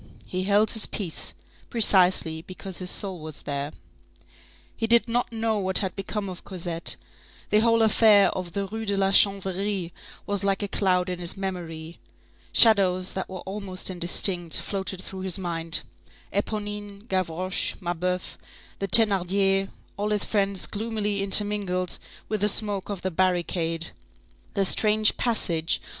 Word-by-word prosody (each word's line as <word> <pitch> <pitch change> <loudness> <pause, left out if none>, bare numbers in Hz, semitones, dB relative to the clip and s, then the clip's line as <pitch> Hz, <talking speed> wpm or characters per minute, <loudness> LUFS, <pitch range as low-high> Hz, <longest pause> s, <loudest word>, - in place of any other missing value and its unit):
He 185 0 -3
held 205 +2 +3
his 220 - 0
peace, 180 -7 -3 0.3
precisely 185 -7 +4
because 185 +1 -8
his 180 -1 -2
soul 190 -2 -2
was 155 -1 -8
there. 140 0 -3 1.0
He 225 - -2
did 235 +1 +4
not 240 +1 -1
know 225 -1 -1
what 190 -1 +1
had 190 -3 +2
become 200 +1 -4
of 185 -2 -8
Cosette; 170 -3 -2 0.6
the 210 - +5
whole 230 0 +3
affair 215 -2 +5
of 180 -3 -6
the 200 0 -2
Rue 220 +3 -6
de 200 0 0
la 195 0 +2
Chanvrerie 195 -2 +1 0.3
was 200 -1 -1
like 195 +1 0
a - - -1
cloud 185 -2 +1
in 180 -1 -4
his 175 +2 -3
memory; 170 -4 -6 0.5
shadows 190 -5 +5
that 190 - -4
were 185 -1 -7
almost 190 -1 -3
indistinct, 175 -1 +2
floated 190 -2 -4
through 190 -1 -8
his 190 0 0
mind, 165 -3 -2 0.5
Éponine, 205 0 -4
Gavroche, 185 -1 -1
Mabeuf, 180 0 -3 0.4
the 195 - -2
Thénardiers, 195 -1 +3 0.3
all 205 +1 -2
his 210 -1 0
friends 200 -2 0
gloomily 210 -2 -3
intermingled 195 -3 +2 0.3
with 215 -1 -3
the 210 - +4
smoke 205 -2 0
of 200 -3 -5
the 185 - -1
barricade; 170 -2 -1 0.6
the 195 -1 +2
strange 215 +2 +3
passage 170 -9 0
of - - -23
M. - - -16
195 Hz, 150 wpm, -25 LUFS, 180-205 Hz, 1.0 s, the